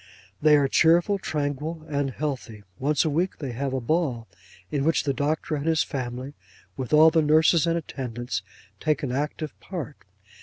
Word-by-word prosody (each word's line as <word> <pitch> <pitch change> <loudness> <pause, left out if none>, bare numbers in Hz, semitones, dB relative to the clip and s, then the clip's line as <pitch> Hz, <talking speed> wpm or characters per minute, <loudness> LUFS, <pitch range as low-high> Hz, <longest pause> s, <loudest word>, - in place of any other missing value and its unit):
They 150 -1 +6
are 140 -1 +3
cheerful, 170 +7 +4
tranquil, 155 0 -3
and 145 -2 -1
healthy. 130 -6 -5 0.2
Once 145 +3 +1
a - - +2
week 175 +5 0
they 135 -4 -5
have 135 +3 -3
a 130 - -1
ball, 125 -4 -1 0.4
in 140 -2 0
which 160 +2 +2
the 140 - 0
Doctor 150 +4 -1
and 150 +1 -2
his 160 -1 +3
family, 130 0 -5 0.4
with 130 -3 -5
all 155 +1 +7
the 160 0 +3
nurses 160 +2 +4
and 165 0 +2
attendants, 125 -6 -4 0.4
take 155 -1 0
an 130 - -1
active 150 +3 -3
part. 165 -6 -6
150 Hz, 175 wpm, -25 LUFS, 135-160 Hz, 0.4 s, all